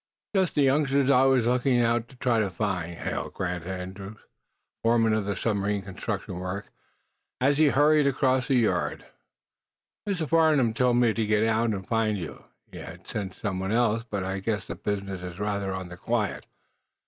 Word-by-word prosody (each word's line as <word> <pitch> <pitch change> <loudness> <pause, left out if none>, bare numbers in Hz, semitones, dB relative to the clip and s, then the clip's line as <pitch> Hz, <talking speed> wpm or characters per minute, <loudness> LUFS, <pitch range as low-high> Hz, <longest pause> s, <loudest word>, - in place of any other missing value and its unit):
"Just 190 -2 +2
the 145 - +4
youngsters 140 0 +3
I 130 0 +5
was 130 -3 +3
going 125 +1 +2
out 120 0 +1
to 130 - -16
try 125 -2 +1
to 105 -3 +1
find," 90 -4 -3
hailed - - -4
Grant 90 -2 -3
Andrews, 95 +3 -6 0.6
foreman 115 -1 +3
of 110 -2 0
the 100 0 -2
submarine 100 -2 -1
construction 95 -1 -5
work, 95 +2 -5 0.7
as 140 +3 +2
he 155 - +6
hurried 145 +2 +4
across 130 -1 +1
the 135 - +2
yard. 120 -3 0 1.0
"Mr. 175 -6 -1
Farnum 155 -8 +3
told 125 +1 +2
me 120 -2 +4
to 110 0 0
get 110 +1 +3
out 115 +1 +2
and 95 -3 -3
find 110 -2 +1
you. 85 -4 -8 0.3
He'd - - -9
have - - -10
sent 95 -3 -5
some 100 -3 -3
one 95 +1 -2
else, 115 -1 +2
but 100 -5 -4
I 95 +1 -3
guess 100 0 -2
the - - -5
business 100 -2 -4
is 90 -1 -7
rather 100 -2 -1
on 95 -1 -5
the 90 - -9
quiet." - - -2
110 Hz, 185 wpm, -27 LUFS, 95-125 Hz, 1.0 s, he